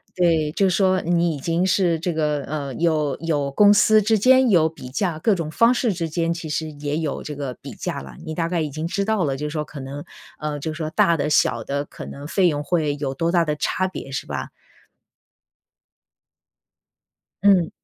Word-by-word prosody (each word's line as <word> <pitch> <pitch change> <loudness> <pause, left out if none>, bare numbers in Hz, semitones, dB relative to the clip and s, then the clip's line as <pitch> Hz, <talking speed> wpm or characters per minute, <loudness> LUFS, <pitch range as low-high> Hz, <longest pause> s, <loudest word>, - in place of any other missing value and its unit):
对， 165 -4 +2
就 195 +2 +2
说 185 0 +2
你 170 -2 +1
已 - - -7
经 170 +5 0
是 175 -4 +2
这 170 +1 -2
个， 150 -2 0
呃， 140 -3 -4
有 155 -4 0
有 145 -3 -1
公 205 +7 +6
司 215 +1 +5
之 220 +1 +2
间 255 +3 +5
有 165 -5 +4
比 155 -5 -11
价， 165 +3 -2
各 205 +4 +2
种 165 -3 -4
方 230 +8 +4
式 240 -3 +1
之 170 -2 -3
间 165 +1 0
其 165 -1 -7
实 155 +1 -2
也 145 0 -3
有 155 -3 -3
这 150 - -6
个 140 -3 -4
比 - - -8
价 - - -4
了。 70 -2 -11
你 160 - -4
大 165 +1 -1
概 170 -1 -1
已 155 - -2
经 155 +4 -4
知 200 +3 -1
道 215 -4 +1
了， 135 -2 -1
就 150 +1 -3
说 150 0 -3
可 145 - -10
能， 140 +2 -7 0.3
呃， 150 -1 -3
就 155 +2 -4
说 155 -1 -4
大 165 +1 +3
的 150 - -1
小 115 -5 +2
的 140 +4 -2
可 - - -10
能 140 +1 -8
费 185 +3 +2
用 145 -3 -1
会 155 -3 0
有 140 -2 -3
多 165 +5 -1
大 170 -2 +3
的 150 -1 -1
差 185 +5 0
别 135 -7 -8
是 135 - -4
吧？ - - -5 2.9
嗯。 190 -4 +5
160 Hz, 225 characters per minute, -22 LUFS, 150-180 Hz, 2.9 s, 公